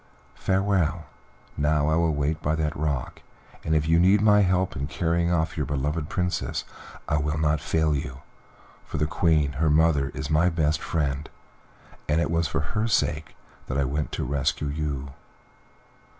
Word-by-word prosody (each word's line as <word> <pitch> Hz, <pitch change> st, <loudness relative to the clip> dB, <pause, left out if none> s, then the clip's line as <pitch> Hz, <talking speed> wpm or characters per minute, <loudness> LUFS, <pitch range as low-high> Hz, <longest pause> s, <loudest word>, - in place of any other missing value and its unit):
Farewell; 95 Hz, -4 st, 0 dB, 0.5 s
now 75 Hz, 0 st, +1 dB
I 80 Hz, -, +2 dB
will 80 Hz, -2 st, +2 dB
wait 75 Hz, +2 st, -1 dB
by 75 Hz, +2 st, 0 dB
that 80 Hz, -1 st, -1 dB
rock, 70 Hz, -4 st, -3 dB, 0.4 s
and 80 Hz, -, 0 dB
if 75 Hz, 0 st, +1 dB
you 80 Hz, +1 st, +4 dB
need 95 Hz, +4 st, +5 dB
my 105 Hz, 0 st, +5 dB
help 95 Hz, -1 st, +1 dB
in 70 Hz, -1 st, -3 dB
carrying 85 Hz, +1 st, 0 dB
off 80 Hz, -2 st, 0 dB
your 75 Hz, -, -1 dB
beloved 75 Hz, +3 st, -2 dB
Princess 90 Hz, 0 st, -2 dB, 0.4 s
I 75 Hz, -, +1 dB
will 75 Hz, +1 st, -1 dB
not 75 Hz, -1 st, +1 dB
fail 80 Hz, 0 st, +1 dB
you, 70 Hz, -2 st, -4 dB, 0.6 s
for -, -, -6 dB
the 75 Hz, -, +1 dB
Queen, 75 Hz, -2 st, +2 dB
her 80 Hz, -, +3 dB
mother, 75 Hz, -2 st, +3 dB
is 70 Hz, -, -4 dB
my 80 Hz, +3 st, +4 dB
best 80 Hz, -3 st, 0 dB
friend, 70 Hz, -3 st, -2 dB, 0.8 s
and 75 Hz, +2 st, +3 dB
it 85 Hz, -, 0 dB
was 85 Hz, -1 st, +1 dB
for 70 Hz, -, -1 dB
her 110 Hz, +1 st, 0 dB
sake 75 Hz, -8 st, 0 dB, 0.3 s
that 65 Hz, -, -2 dB
I 70 Hz, -, +2 dB
went 75 Hz, +3 st, -2 dB
to -, -, -2 dB
rescue 70 Hz, +1 st, -1 dB
you." 70 Hz, -2 st, -3 dB
75 Hz, 170 wpm, -25 LUFS, 75-85 Hz, 0.8 s, need